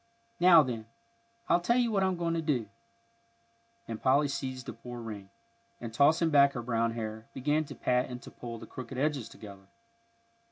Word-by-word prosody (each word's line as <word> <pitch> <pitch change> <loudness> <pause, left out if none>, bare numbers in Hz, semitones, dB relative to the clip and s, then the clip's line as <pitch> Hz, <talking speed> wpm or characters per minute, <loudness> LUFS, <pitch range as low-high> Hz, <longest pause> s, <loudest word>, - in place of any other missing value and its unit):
"Now, 175 -3 +8
then, 115 -4 -5 0.6
I'll 175 - +4
tell 235 +8 +2
you 240 -2 +2
what 200 -2 +1
I'm 190 -1 +1
going 170 -1 -1
to 165 - 0
do," 135 -8 0 1.2
and 115 -1 -6
Polly 140 +3 +4
seized 130 -2 -4
the - - -6
poor 120 +1 -9
ring, 105 -4 -7 0.5
and, 115 -2 -7
tossing 160 +6 +4
back 140 -1 +6
her 120 - -4
brown 115 -1 0
hair, 110 -1 -5
began 150 +4 +1
to - - -9
pat 125 0 +1
and 125 -1 -6
to - - -11
pull 115 -1 -7
the - - -10
crooked 130 0 -8
edges 140 -4 -1
together. 100 -3 -12
130 Hz, 185 wpm, -30 LUFS, 115-155 Hz, 1.2 s, Now